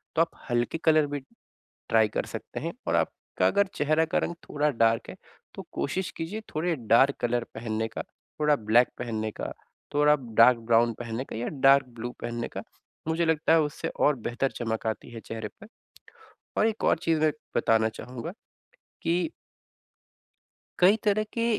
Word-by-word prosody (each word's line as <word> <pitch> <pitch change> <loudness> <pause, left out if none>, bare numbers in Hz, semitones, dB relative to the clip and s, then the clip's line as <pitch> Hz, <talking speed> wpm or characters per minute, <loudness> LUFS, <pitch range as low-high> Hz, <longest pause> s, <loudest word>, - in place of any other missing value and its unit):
तो 160 - +4
आप 165 - +1 0.2
हल्के 120 +5 0
कलर 155 -2 +4
भी, 145 0 -3 0.7
ट्राई 110 -1 +4
कर - - -2
सकते - - -7
हैं 165 +2 -3
और - - +2
आपका - - -1
अगर 200 0 +3
चेहरे 155 +2 +2
का - - +5
रंग 170 - -2 0.2
थोड़ा 150 +1 +1
डार्क 115 -3 +2
है - - -9 0.4
तो - - -6
कोशिश 185 +6 -2
कीजिए 170 +7 -4
थोड़ा 165 +2 +1 0.2
डार्क 135 +4 +5
कलर 120 0 0
पहनने 110 -1 -2
का, 115 - -5 0.4
थोड़ा 150 -1 +4
ब्लैक 115 +1 +4
पहनने 110 -3 -2
का, - - -5 0.4
थोड़ा 150 +1 +5 0.2
डार्क 125 +1 +8
ब्राउन 115 +1 +3
पहनने 120 +2 -3
का - - -8
या 120 +2 -2 0.2
डार्क 135 -1 +7
ब्लू 120 +2 -3
पहनने 120 0 -3
का। - - -6 0.5
मुझे 165 +1 +1
लगता 160 0 +2
है 165 - +6
उससे 150 0 -3
और 145 -1 +4
बेहतर 120 +3 0
चमक 115 -1 -2
आती 110 +2 -3
है 115 - -8
चेहरे 110 -1 -6
पे। 215 - -11 0.9
और - - +4
एक 225 -1 -2
और - - +4
चीज़ 160 -1 +1
मैं 155 0 +4 0.3
बताना 110 -1 +3
चाहूँगा 125 +6 -7 0.7
कि 175 - +1 1.5
कई 190 +4 +6
तरह 215 0 +2
के 230 - -1
135 Hz, 170 wpm, -27 LUFS, 115-160 Hz, 1.5 s, डार्क